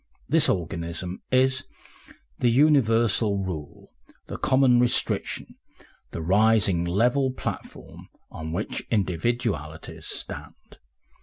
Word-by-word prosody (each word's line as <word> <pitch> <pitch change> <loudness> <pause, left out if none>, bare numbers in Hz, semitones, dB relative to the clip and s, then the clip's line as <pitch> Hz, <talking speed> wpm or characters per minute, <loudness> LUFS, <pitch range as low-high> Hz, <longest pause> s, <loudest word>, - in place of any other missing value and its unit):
This 155 -1 +3
organism 85 0 -3
is 130 0 +2 0.7
the 120 - +3
universal 115 -6 +3
rule, 90 -7 -6 0.3
the - - -7
common 130 -2 +4
restriction, 120 0 -1 0.5
the 80 - -6
rising 100 -1 +3
level 120 +9 +2
platform 130 - -7 0.2
on 80 0 -6
which 90 +6 -3
individualities 95 - -2
stand. - - -7
110 Hz, 90 wpm, -25 LUFS, 85-125 Hz, 0.7 s, common